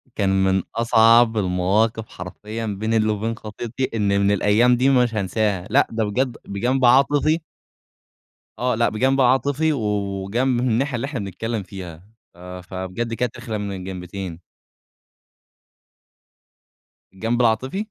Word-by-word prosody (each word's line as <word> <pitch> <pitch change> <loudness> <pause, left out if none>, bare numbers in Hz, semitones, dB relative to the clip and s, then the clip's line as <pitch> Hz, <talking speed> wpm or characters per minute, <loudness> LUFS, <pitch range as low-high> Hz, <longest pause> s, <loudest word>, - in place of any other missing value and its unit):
كان 100 -2 +1
من 95 -1 +2
أصعب 115 0 +4
المواقف 105 +4 0
حرفيًا 105 +5 -7
بين 110 +2 -2
الل 110 -1 +2
وبين 110 +2 -2
خطيبتي، 115 +4 -5
إن 105 -2 0
من 100 +1 +3
الأيام 105 +5 +3
دي 130 +3 +3
مش 125 -3 +3
هانساها، 100 -1 -1
لأ - - +3
ده 115 -1 -1
بجد 125 +4 -1
بجنب 125 +6 0
عاطفي. 145 +5 +4 1.2
آه، 125 0 +1
لأ 115 +1 +2
بجنب 130 +5 +1
عاطفي 140 +5 +2
و 135 - -3 0.4
وجنب 120 +5 0
من 125 - +1
الناحية 125 +3 0
اللي 120 - -2
إحنا 140 -3 -4
بنتكلم 105 +3 -4
فيها 90 -3 -9 0.3
آآ، 90 +1 -9
ف 90 - -21
فبجد 95 +5 -4
كانت 120 0 -2
رخمه 110 -4 -5
من 100 -1 -4
الجنبتين. 90 -1 -7 2.7
الجنب 115 +5 -1
العاطفي. 130 - 0
110 Hz, 135 wpm, -22 LUFS, 100-125 Hz, 2.7 s, أصعب